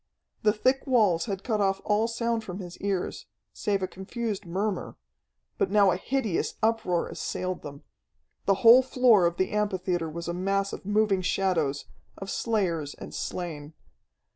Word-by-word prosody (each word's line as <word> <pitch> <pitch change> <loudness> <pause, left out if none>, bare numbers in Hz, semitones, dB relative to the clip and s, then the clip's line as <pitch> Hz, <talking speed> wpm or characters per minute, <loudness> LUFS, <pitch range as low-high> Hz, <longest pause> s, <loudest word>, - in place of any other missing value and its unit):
The 210 - +4
thick 255 +6 +1
walls 205 -10 +3
had 195 -1 -4
cut 215 -4 0
off 195 -1 +1
all 210 +2 +2
sound 230 -1 -1
from 185 -4 -6
his 180 -3 -8
ears, 195 -2 -3 0.3
save 200 -3 -1
a - - 0
confused 205 +1 -5
murmur, 190 +2 -2 0.6
but - - +2
now 200 -1 +5
a - - +1
hideous 220 -1 -1
uproar 220 -6 +1
assailed 185 0 -4
them. 140 -1 -9 0.6
The 195 - +5
whole 240 +3 +10
floor 250 -8 +4
of 170 0 -3
the 185 - 0
amphitheatre 185 -5 -1
was 170 +2 -6
a 170 - -2
mass 195 +2 -1
of - - -8
moving 205 -2 +2
shadows, 175 -7 0 0.3
of 195 - -6
slayers 175 -10 -1
and - - -10
slain. 160 -4 -5
195 Hz, 160 wpm, -27 LUFS, 175-215 Hz, 0.6 s, whole